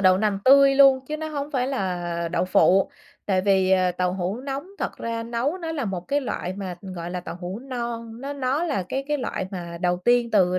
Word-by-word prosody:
đậu 185 -1 +5
nành 210 -2 +1
tươi 275 +1 +7
luôn 270 -1 +7
chứ 305 - -3
nó 315 0 -4
hông 290 -1 -4
phải 255 -4 0
là 175 -9 -2
đậu - - +1
phụ, 185 +1 +4 0.4
tại 190 -2 +2
vì, 190 -1 +3
ờ, 185 -1 +3
tàu 180 0 0
hũ 190 +5 -2
nóng 275 +4 -4
thật - - -3
ra 230 0 -3
nấu 240 +9 -2
nó 330 -2 -4
là 285 -6 -2
một 190 -4 -3
cái 285 +1 +2
loại 210 -8 -3
mà, 185 -2 -5
gọi 180 -3 -6
là, 180 0 -3
tàu 175 - -7
hũ 185 +4 -5
non, 235 -3 -5
nó 280 +2 -4
nó 280 +3 0
là 285 - -1
cái 270 +6 -2
cái 295 - +1
loại 220 -7 -3
mà 170 -2 -6
đầu 180 -1 +2
tiên 240 -1 +3
từ 185 -4 +3
225 Hz, 235 wpm, -24 LUFS, 185-270 Hz, 0.4 s, tươi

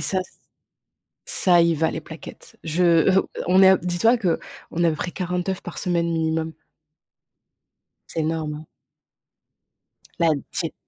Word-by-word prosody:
ça 190 -1 0 1.1
ça 175 -2 +3
y 170 -1 +3
va 160 +1 +1
les 160 - -4
plaquettes. 160 +1 -12
Je, 165 +2 0 0.3
heu, 190 +1 +2 0.2
on 185 +2 +5
est 190 0 +7
dis-toi 225 +8 +3
que, 180 -6 0 0.3
on 170 - -1
est - - +5
à - - +3
peu 155 - -3
près 175 - -4
40 180 0 -3
œufs 190 - -2
par 175 - -8
semaine 170 -2 0
minimum. 160 0 -1 1.6
C'est 165 - -3
énorme. 155 -1 -3 1.5
Là, 165 -2 +3
de 140 - -5
cette - - -2
170 Hz, 150 wpm, -23 LUFS, 160-180 Hz, 1.6 s, est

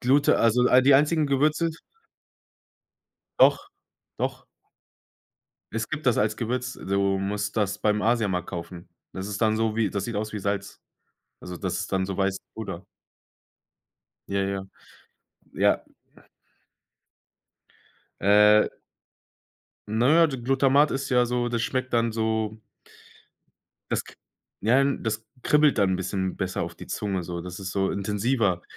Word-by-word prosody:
Glute 140 +3 +3
also, 115 +2 +3
all 130 +1 +6
die 135 +1 +6
einzigen 150 +2 +3
Gewürze 150 +4 +2 1.7
Doch, 400 - +4 0.5
doch. - - -3 1.3
Es - - -2
gibt 155 0 -5
das 125 -4 +3
als 105 0 +1
Gewürz. 125 +2 -3
Du 100 0 0
musst 100 +2 -3
das 105 -2 0
beim 105 0 +1
Asiamarkt 105 -6 +1
kaufen. 85 0 -8 0.2
Das 95 0 -5
ist 100 0 -5
dann 110 -1 +2
so 110 -1 0
wie 110 -2 +1
das 100 0 -3
sieht 115 -3 -4
aus 105 +1 -2
wie - - -2
Salz. 100 0 -4 0.6
Also 90 0 -8
das - - -3
ist - - -5
dann 95 -1 0
so 95 -1 -4
weißes 95 -1 0 0.2
Pulver. 95 -5 -6 1.4
Ja, 100 0 0
ja. 95 0 -3 0.9
Ja. - - +2 2.4
Äh 105 +2 +5 1.2
Ne, 135 +10 +4
d 135 - -4
Glutamat 135 +3 +3
ist 135 +1 -3
ja 125 -1 +3
so 120 0 -1
das 120 -1 -1
schmeckt 130 +1 -2
dann 115 -1 +1
so 110 -1 -1 1.3
das - - -1
k - - -14 0.5
Ja, 120 +6 +3
n 140 0 0
das 110 -1 -2
k - - -37 0.2
kribbelt 150 -3 +3
dann 100 -2 +3
´n - - +1
bisschen 95 0 -3
besser 95 -1 -2
auf - - -5
die - - -10
Zunge 95 -3 -3
so, 85 0 -5
das 90 +1 -8
ist 95 -1 -6
so 95 -1 0
intensiver. 105 -2 0
110 Hz, 145 wpm, -25 LUFS, 95-125 Hz, 2.4 s, all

